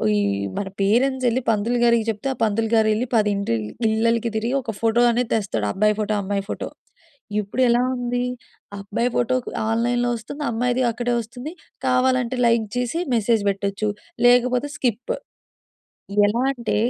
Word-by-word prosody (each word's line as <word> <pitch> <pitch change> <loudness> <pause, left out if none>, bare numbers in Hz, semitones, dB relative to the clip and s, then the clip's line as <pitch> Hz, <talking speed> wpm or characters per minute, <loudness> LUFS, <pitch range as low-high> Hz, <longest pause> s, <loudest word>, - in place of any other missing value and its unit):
ఈహ్, 100 -1 0
మన 200 - -2
పేరెంట్సెళ్లి 250 +4 +2
పంతులు 225 +2 +1
గారికి 235 -1 +4
చెప్తే, 220 +4 -3
ఆ - - -11
పంతులు 225 +1 +1
గారెళ్లి, 220 +1 +3
10 210 -2 +3
ఇంటిల్ 115 - -1 0.2
ఇళ్ళలకి 230 +1 +1
తిరిగి, 225 +2 -1
ఒక 230 -3 -5
ఫోటో 230 +1 +2
అనేది 240 0 0
తెస్తాడు. 195 - -1
అబ్బాయి 210 - +2
ఫోటో, 215 0 0
అమ్మాయి 200 0 -2
ఫోటో. - - -4 0.7
ఇప్పుడు 205 +5 -3
ఎలా 240 +1 +4
ఉంది, 245 0 -1 0.6
అబ్బాయి 210 +5 -1
ఫోటో 245 +1 +1 0.3
ఆన్‌లైన్‌లో 240 +2 +1
వస్తుంది. 285 +7 -7
అమ్మాయిది 245 +2 0
అక్కడే 240 +1 -2
వస్తుంది. 245 +7 -8 0.3
కావాలంటే, 255 -1 +2
లైక్ 230 -1 +3
జేసి 245 +7 -1
మెసేజ్ 225 -1 +2
బెట్టొచ్చు. 200 +2 -1 0.4
లేకపోతే 250 +3 +3
స్కిప్. 250 - -1 1.1
ఎలా 220 +4 0
అంటే 235 -4 -2
230 Hz, 140 wpm, -22 LUFS, 210-245 Hz, 1.1 s, గారికి